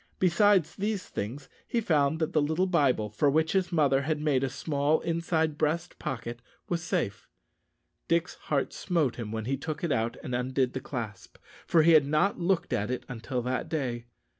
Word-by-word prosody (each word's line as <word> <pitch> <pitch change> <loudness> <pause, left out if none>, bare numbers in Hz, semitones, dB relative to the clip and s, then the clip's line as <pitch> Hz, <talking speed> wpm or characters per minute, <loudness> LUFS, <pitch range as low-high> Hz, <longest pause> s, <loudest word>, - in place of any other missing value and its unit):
Besides 185 -1 +3
these 205 -1 -2
things, 130 +7 -5 0.2
he 235 - 0
found 155 -7 +2
that 160 +2 -2
the 155 - +3
little 160 +5 +1
Bible, 140 - +2
for 140 +7 +2
which 160 +3 +2
his 190 -2 +1
mother 140 -5 +3
had 150 +2 -1
made 145 -3 +1
a 135 - 0
small 145 +2 0
inside 165 -2 0
breast 160 +3 -1
pocket, 120 -1 -5 0.3
was 170 -1 -1
safe. 100 - -2 0.8
Dick's 170 +1 +1 0.2
heart 140 -3 0
smote 165 -9 0
him 110 -3 -5
when 110 -1 -3
he 135 +3 -1
took 155 +3 -5
it 170 - 0
out 115 -2 0
and 125 - -5
undid 130 +1 0
the 130 - -2
clasp, 115 -7 -6 0.3
for 165 -2 +5
he 165 - +6
had 155 -4 +6
not 155 +8 +2
looked 175 -4 0
at 105 -2 0
it 125 - -3
until 125 0 -4
that 125 +1 -2
day. 125 -6 -2
150 Hz, 190 wpm, -28 LUFS, 125-170 Hz, 0.8 s, he